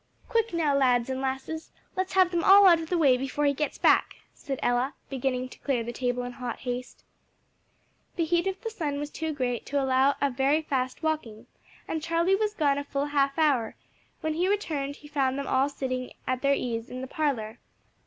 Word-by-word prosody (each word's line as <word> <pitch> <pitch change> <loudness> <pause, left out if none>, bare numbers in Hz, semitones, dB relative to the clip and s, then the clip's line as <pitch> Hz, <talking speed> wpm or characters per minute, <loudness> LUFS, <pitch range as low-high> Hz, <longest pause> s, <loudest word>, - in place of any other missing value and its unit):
"Quick, 460 0 +1
now, 315 -5 +1
lads 250 -2 +3
and 260 0 -3
lasses, 270 +4 -4 0.3
let's 375 0 -2
have 370 -1 +4
them 345 -1 0
all 400 +1 +8
out 345 -3 +7
of 325 -1 -6
the 360 - +1
way 275 -6 +5
before 270 +3 -2
he 285 - +3
gets 300 +2 -2
back," - - +3 0.2
said 270 -3 -5
Ella, 245 +3 +1 0.2
beginning 255 -1 -1
to - - -14
clear 255 -5 -1
the 240 +1 -5
table 245 0 -1
in 245 - -5
hot 245 -2 -5
haste. 250 0 -5 1.1
The 335 - 0
heat 345 +3 +1
of 385 0 -2
the 455 - -4
sun 300 -9 -3
was 290 +1 -4
too 320 -1 -3
great 250 -5 -2
to 285 - 0
allow 265 +1 +3
of 280 -2 +1
very 275 +5 +2
fast 260 -1 -2
walking, 300 -9 -2 0.4
and 320 - -2
Charlie 335 +3 +1
was 425 +1 -1
gone 285 -5 +2
a - - -4
full 280 0 -2
half 280 -1 +1
hour; 275 -8 +2 0.5
when 315 0 -1
he 350 +4 +1
returned 305 -9 -1
he 295 - -14
found 275 -3 0
them 280 - -3
all 265 +2 +2
sitting 255 -3 -4
at 255 0 -1
their 280 0 +3
ease 230 -3 -3
in 255 0 -6
the 260 - -5
parlor. 245 -7 -2
280 Hz, 210 wpm, -27 LUFS, 255-320 Hz, 1.1 s, all